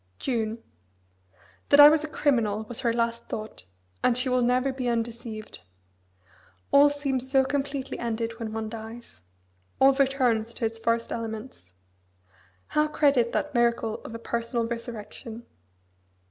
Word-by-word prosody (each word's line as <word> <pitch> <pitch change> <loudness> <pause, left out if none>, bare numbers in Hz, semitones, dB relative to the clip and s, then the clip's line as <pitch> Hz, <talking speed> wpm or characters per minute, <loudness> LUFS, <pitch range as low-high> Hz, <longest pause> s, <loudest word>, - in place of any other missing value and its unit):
June. 225 -3 -2 1.1
That 285 - +6
I 290 - +12
was 305 0 +4
a - - -3
criminal 230 -9 +1
was 225 +1 -4
her 235 -3 +1
last 235 0 -1
thought, 215 - -7 0.4
and 245 - +3
she 255 +1 +1
will 250 0 +2
never 250 +2 +2
be 260 -1 -3
undeceived. 230 -2 -4 1.1
All 285 +1 +7
seems 275 -3 -2
so 265 -1 +4
completely 275 -1 -3
ended 230 0 -3
when 225 -2 -4
one 220 0 -3
dies. 225 - -9 0.6
All 270 +1 +6
returns 255 -5 +1
to 235 - -2
its 225 0 -3
first 230 0 0
elements. 220 - -6 1.0
How 300 0 +2
credit 280 -6 +2
that 295 0 -1
miracle 235 -2 +1
of 230 - -8
a - - -3
personal 235 0 -2
resurrection? 230 0 -7
235 Hz, 140 wpm, -26 LUFS, 225-265 Hz, 1.1 s, I